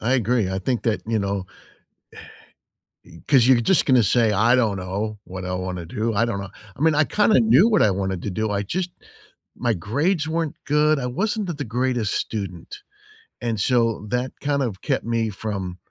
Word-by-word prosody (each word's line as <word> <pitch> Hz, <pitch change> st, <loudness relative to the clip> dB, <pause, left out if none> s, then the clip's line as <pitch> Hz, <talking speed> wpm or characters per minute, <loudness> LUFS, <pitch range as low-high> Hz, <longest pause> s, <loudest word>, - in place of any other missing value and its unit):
I 115 Hz, +4 st, 0 dB
agree, 120 Hz, -4 st, +1 dB
I 95 Hz, 0 st, -2 dB
think 120 Hz, +4 st, -1 dB
that, 115 Hz, -2 st, 0 dB
you 115 Hz, -1 st, 0 dB
know, 100 Hz, -1 st, -2 dB, 1.6 s
eh -, -, -16 dB
eh, 85 Hz, -, -12 dB
'cause 130 Hz, -4 st, +5 dB
you're 125 Hz, -3 st, +5 dB
just 190 Hz, +9 st, +3 dB
gonna 130 Hz, -3 st, +5 dB
say, 110 Hz, +1 st, +3 dB
"I 115 Hz, +5 st, +4 dB
don't 110 Hz, -6 st, +1 dB
know 100 Hz, +3 st, -4 dB
what 95 Hz, 0 st, -7 dB
I 90 Hz, -, -3 dB
wanna 90 Hz, -1 st, -4 dB
do, 110 Hz, +6 st, -2 dB
I 115 Hz, +3 st, +3 dB
don't 115 Hz, -4 st, -3 dB
know," 100 Hz, -, -7 dB, 0.3 s
I 135 Hz, -, -11 dB
mean, 160 Hz, -2 st, +4 dB
I 155 Hz, -, +4 dB
kinda 210 Hz, -, +3 dB
knew 125 Hz, -, +5 dB
what 215 Hz, -3 st, +3 dB
I 105 Hz, -, +4 dB
wanted 95 Hz, -1 st, -2 dB
to 100 Hz, -, -3 dB
do, 110 Hz, +2 st, -2 dB
I 100 Hz, 0 st, -1 dB
just 180 Hz, -, -2 dB, 0.7 s
my 120 Hz, -2 st, 0 dB
grades 145 Hz, -, 0 dB
weren't 160 Hz, -1 st, -2 dB
good, 150 Hz, +1 st, +3 dB
I 125 Hz, -, -3 dB
wasn't 205 Hz, -, -1 dB
the 175 Hz, -, -2 dB
the 145 Hz, -1 st, -5 dB
greatest 120 Hz, -2 st, -1 dB
student, 95 Hz, -6 st, -5 dB, 0.6 s
and 115 Hz, -2 st, -1 dB
so 115 Hz, -3 st, +1 dB
that 125 Hz, +2 st, -2 dB
kind 140 Hz, -1 st, 0 dB
of 105 Hz, -7 st, -4 dB
kept -, -, -1 dB
me 115 Hz, -1 st, 0 dB
from 100 Hz, -3 st, -5 dB
115 Hz, 205 wpm, -23 LUFS, 100-130 Hz, 1.6 s, cause